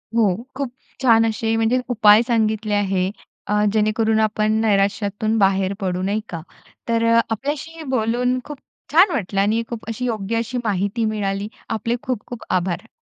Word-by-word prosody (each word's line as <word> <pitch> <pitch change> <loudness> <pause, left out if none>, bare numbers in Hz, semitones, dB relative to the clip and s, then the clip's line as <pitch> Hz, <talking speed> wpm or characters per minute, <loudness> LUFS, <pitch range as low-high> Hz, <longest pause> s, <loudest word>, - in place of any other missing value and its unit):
हो. 210 -6 +3 0.2
खूप 270 -2 -3 0.3
छान 225 -3 +5
असे 225 0 0
म्हणजे 225 +3 +2
उपाय 215 -2 +6
सांगितले 220 -2 0
आहे. 190 -2 +1 0.4
अ, 210 0 +2
जेणेकरून 220 +1 +2
आपण 215 0 +1
नैराश्यातून 205 +1 +1
बाहेर 195 -1 +2
पडू, 185 -2 -2
नाही 200 +3 -1
का. 165 -2 -5 0.5
तर 230 0 +2 0.3
आपल्याशी 290 +7 -4
बोलून 250 +1 +1
खूप 295 -1 -8 0.3
छान 350 +7 +6
वाटलं 195 -1 -1
आणि 215 +3 +2
खूप 235 -2 -6
अशी 225 +3 -3
योग्य 225 -1 -2
अशी 235 +2 -2
माहिती 205 +2 -1
मिळाली. 205 -2 -2 0.2
आपले 230 +2 -1
खूप-खूप 245 -1 -5
आभार. 180 +3 -1
220 Hz, 145 wpm, -21 LUFS, 200-230 Hz, 0.5 s, उपाय